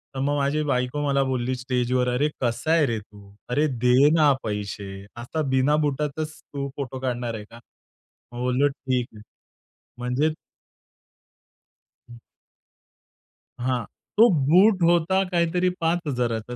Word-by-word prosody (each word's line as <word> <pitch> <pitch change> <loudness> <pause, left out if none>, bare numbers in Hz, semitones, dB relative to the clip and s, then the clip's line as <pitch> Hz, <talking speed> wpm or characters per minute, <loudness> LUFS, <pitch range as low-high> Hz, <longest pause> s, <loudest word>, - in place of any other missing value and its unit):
तर - - -3
मग 145 +2 0
माझी 145 +2 0
बायको 125 +1 -1
मला 140 0 +2
बोलली 130 -1 -1
स्टेजवर, 125 0 0
"अरे 145 +4 +1
कसा 120 +6 -1
आहे 160 -3 +4
रे 115 -4 -1
तू? 100 -1 -16 0.2
अरे 150 +5 +2 0.2
दे 130 +4 +6
ना 150 -3 +5
पैसे. 100 -2 -5
आता 125 +7 -4
बिना 130 +3 +3
बुटाचच 150 +2 -3
तू 140 -1 -5
फोटो 130 -2 -5
काढणार 120 -2 -2
आहे 105 - -6
का?" 115 - -12 0.7
मग 120 - -8
बोललो, 125 +3 +2
"ठीक 130 -3 -2
आहे." 105 - -12 0.8
म्हणजे 125 +6 0 1.8
हं. 120 - -12 1.4
हां, 125 -1 -1 0.3
तो 230 +2 +8 0.2
बूट 190 +2 +5
होता 175 +3 +3
काहीतरी 175 +1 +1
5,000चा, 125 -9 -1
130 Hz, 130 wpm, -24 LUFS, 120-150 Hz, 1.8 s, तो